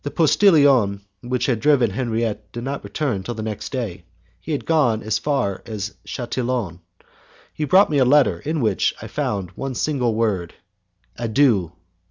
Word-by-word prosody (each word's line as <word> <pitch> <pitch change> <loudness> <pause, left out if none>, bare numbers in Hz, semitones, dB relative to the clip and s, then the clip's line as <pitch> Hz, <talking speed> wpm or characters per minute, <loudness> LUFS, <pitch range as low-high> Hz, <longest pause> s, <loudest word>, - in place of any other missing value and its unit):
The 145 - -3
postillion 145 - +4 0.2
who 125 - -9
had 120 -5 0
driven 135 -5 +3
Henriette 110 -3 -2
did 120 - -5
not 140 +2 -4
return 135 -11 -2
till 120 +5 -5
the 110 - -5
next 110 -2 -5
day; 110 -9 -4 0.4
he 160 - -7
had 145 - -2
gone 135 -9 +2
as 110 - 0
far 130 -10 -1
as 110 -1 -5
Chatillon. 120 -7 -3 0.7
He 155 - -2
brought 190 +5 +5
me 145 - +2
a - - +5
letter 130 - +4
in 155 - -2
which 105 -5 +1
I - - -8
found 95 -4 -3
one 135 +6 -5
single 125 -7 0
word: 100 -7 -1 0.6
Adieu! 115 - +2
120 Hz, 165 wpm, -21 LUFS, 105-140 Hz, 0.7 s, brought